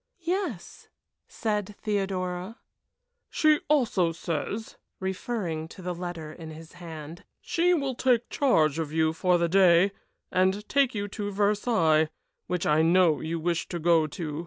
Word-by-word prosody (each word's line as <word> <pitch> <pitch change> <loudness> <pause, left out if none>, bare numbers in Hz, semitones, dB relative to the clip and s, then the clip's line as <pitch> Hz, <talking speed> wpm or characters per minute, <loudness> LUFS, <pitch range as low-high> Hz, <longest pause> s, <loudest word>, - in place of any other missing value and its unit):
"Yes," 345 - -3 0.4
said 210 -2 -3
Theodora. 190 -1 -2 0.7
"She 310 -1 +3
also 230 - +2
says," 170 +7 -4 0.2
referring 190 -4 -3
to 185 - -12
the 180 0 -2
letter 170 -3 -6
in 160 -1 -9
his 160 +1 -11
hand, 165 -1 -9 0.2
"she 355 +1 +2
will 275 -4 -1
take 245 -1 +2
charge 160 - +2
of 155 -2 -3
you 160 0 +2
for 180 +2 +2
the 170 0 +1
day, 185 +1 +5 0.4
and 190 +3 +1
take 275 -3 +2
you 205 0 -2
to 205 +1 -4
Versailles, 200 -6 +2 0.4
which 180 -1 -2
I 150 +1 +3
know 170 -1 +4
you 165 +1 -3
wish 170 0 -1
to 175 - -4
go 165 -1 +3
to. 155 0 -5
180 Hz, 145 wpm, -27 LUFS, 165-210 Hz, 0.7 s, day